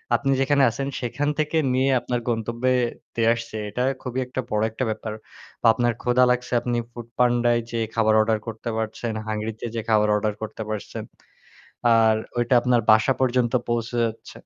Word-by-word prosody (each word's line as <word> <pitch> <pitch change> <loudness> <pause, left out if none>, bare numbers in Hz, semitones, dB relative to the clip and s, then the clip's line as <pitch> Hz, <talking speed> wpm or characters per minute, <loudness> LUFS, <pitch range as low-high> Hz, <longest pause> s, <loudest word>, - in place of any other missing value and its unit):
আপনি 135 +3 0
যেখানে 140 0 +3
আছেন 135 +4 -4
সেখান 145 +5 -1
থেকে 155 +1 0 0.2
নিয়ে 130 +1 +2
আপনার 120 0 -2
গন্তব্যে 120 +3 0 0.4
দিয়ে 115 -1 +2
আসছে। 115 -1 -7
এটা 125 +5 -2 0.2
খুবই 125 0 -4
একটা 130 +1 -4
বড় 105 0 0
একটা 120 - -3
ব্যাপার। 110 0 -4 0.5
বা - - +3
আপনার 120 0 +1
ক্ষুধা 125 +1 +3
লাগছে 125 0 -2
আপনি 120 -1 -1
foodpanda 120 +1 0
য় - - +2
যেয়ে 115 -1 -1
খাবার 110 -1 +3
অর্ডার 110 0 +2
করতে 115 +1 -5
পারছেন, 110 +1 -3
হাংরিতে 110 +1 -4
যে 115 - -1
খাবার 105 -1 +3
অর্ডার 105 0 0
করতে 110 0 -6
পারছেন। 105 -2 -5 0.9
আর 110 -1 +5 0.2
ওইটা 120 +1 +1
আপনার 120 -1 +2
বাসা 110 +5 +4
পর্যন্ত 125 -2 +1 0.2
পৌঁছে 120 0 -1
যাচ্ছে। 115 0 -4
120 Hz, 170 wpm, -24 LUFS, 110-125 Hz, 0.9 s, আর